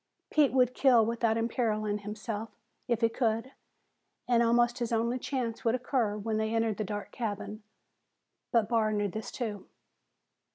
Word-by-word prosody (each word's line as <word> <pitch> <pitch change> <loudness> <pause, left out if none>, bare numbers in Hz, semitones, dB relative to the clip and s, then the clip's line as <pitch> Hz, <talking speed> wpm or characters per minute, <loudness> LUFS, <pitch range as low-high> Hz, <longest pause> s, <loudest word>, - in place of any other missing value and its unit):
Pete 300 -3 +4
would 250 -1 +3
kill 250 -5 +5
without 230 -1 +1
imperiling 215 -3 0
himself, 210 +1 -5 0.4
if 235 -2 0
he 230 - +4
could, 230 +1 -1 0.8
and 240 -1 +4
almost 240 +1 +3
his 240 -1 -2
only 235 +2 +1
chance 245 -4 -3
would 230 +1 +2
occur 245 -4 0
when 215 +1 -2
they 220 +1 0
entered 225 -2 +1
the 215 - -1
dark 205 0 -5
cabin. 215 -2 -4 0.9
But 230 -3 +3
Barr 225 -2 +2
knew 205 -1 0
this 220 +4 -6
too. 215 -5 -4
230 Hz, 155 wpm, -30 LUFS, 215-240 Hz, 0.9 s, kill